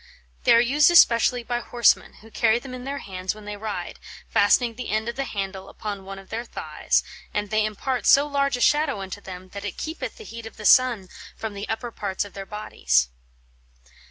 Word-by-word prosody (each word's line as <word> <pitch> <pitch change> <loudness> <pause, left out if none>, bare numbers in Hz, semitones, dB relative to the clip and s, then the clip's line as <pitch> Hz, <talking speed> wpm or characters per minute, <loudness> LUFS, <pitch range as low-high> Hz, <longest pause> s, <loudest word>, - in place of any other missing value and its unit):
They - - +7
are - - +7
used 280 +6 +4
especially 245 -7 +5
by 240 +1 -2
horsemen, 240 -1 +2
who 225 - -15
carry 225 0 +3
them 255 +1 -8
in 250 0 -7
their 280 +1 -3
hands 185 0 -4
when 215 -1 -12
they 210 0 -5
ride, 205 -4 -5 0.3
fastening 230 +4 +3
the 250 +2 -6
end 215 +2 0
of 235 - -3
the 275 - -2
handle 195 -3 -5
upon 200 -2 -6
one 195 0 -7
of 195 0 -13
their 230 +2 -3
thighs, - - -1 0.3
and 210 -1 -2
they 215 0 +3
impart 225 +4 -2
so 280 +1 +7
large 280 -2 0
a - - -6
shadow 295 -5 +3
unto 195 +1 -7
them, 185 -1 -9
that 200 +1 -8
it 205 -3 -5
keepeth 315 +1 -5
the 450 - -10
heate 230 - -8
of - - -13
the 210 - -8
sunne 240 -4 +5 0.3
from 220 -2 -5
the 200 +1 -6
upper 230 +2 -3
parts 200 -2 -3
of 200 - -12
their 195 -1 -7
bodies." 60 - +1
220 Hz, 215 wpm, -24 LUFS, 200-245 Hz, 0.3 s, They